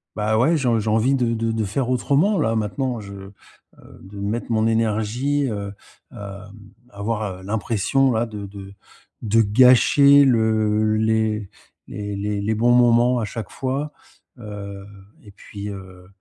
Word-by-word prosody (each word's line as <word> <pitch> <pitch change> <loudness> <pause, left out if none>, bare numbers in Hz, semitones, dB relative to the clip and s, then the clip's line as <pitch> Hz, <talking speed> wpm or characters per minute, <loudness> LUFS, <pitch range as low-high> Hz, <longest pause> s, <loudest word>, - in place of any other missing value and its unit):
bah, 110 +1 0
ouais, 145 +9 +3
je 125 -6 +1
j'ai 110 +1 -2
envie 110 +5 +2
de 120 -3 0
de 115 0 -1
de 110 -1 -1
faire 120 +6 -2
autrement, 145 - +1
là, 115 0 0
maintenant, 115 +3 -2
je 100 -1 -10
heu, 95 0 -11 0.7
de 100 +2 -13
mettre 105 +4 -3
mon 110 -1 +1
énergie, 115 +5 0
heu, 100 -1 -5 0.4
hem, 100 0 -10 0.4
avoir, 100 -3 -4
heu, - - -15
l'impression, 110 +6 0
là, 115 +1 0
de 105 -3 -8
de 100 0 -11 0.5
de 115 +1 +2
gâcher 130 +5 +5
le 110 -3 +2
les 110 -2 0 0.4
les 105 0 -6 0.2
les 105 +2 -1
bons 120 +3 +2
moments 120 0 +4
à 110 - -2
chaque 110 +2 -7
fois, 135 +3 -3 0.5
heu 100 -3 -8 0.4
et 105 - -15
puis, 100 +1 -10
heu, 95 -2 -11
110 Hz, 150 wpm, -21 LUFS, 100-120 Hz, 0.7 s, gâcher